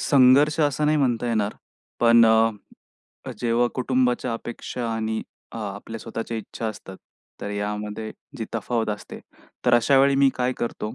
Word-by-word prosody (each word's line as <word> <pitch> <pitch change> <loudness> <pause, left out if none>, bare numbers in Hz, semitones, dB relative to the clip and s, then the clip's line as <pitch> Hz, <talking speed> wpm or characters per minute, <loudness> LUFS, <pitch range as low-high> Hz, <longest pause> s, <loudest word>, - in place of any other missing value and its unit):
संघर्ष 140 +3 +5
असं 145 0 +1
नाही 155 +1 +3
म्हणता 125 -4 +1
येणार. 110 -2 0 0.5
पण 115 0 +6
अ, 110 0 +5 0.9
जेव्हा 120 0 +2
कुटुंबाच्या 125 -1 0
अपेक्षा 120 +1 -5
आणि 110 0 -2 0.3
अ, - - -6
आपल्या 105 +2 -6
स्वतःच्या 115 +1 -5
इच्छा 110 +1 -6
असतात. 95 -3 -9 0.4
तर 100 - -4
यामध्ये 105 +1 -4 0.3
जी 110 - -2
तफावत 115 0 -1
असते. 105 - -7 0.5
तर 125 - +5
अशा 135 +3 +4
वेळी 140 +1 +4
मी 140 0 +5
काय 125 0 0
करतो 110 -2 -4
115 Hz, 150 wpm, -24 LUFS, 110-125 Hz, 0.9 s, पण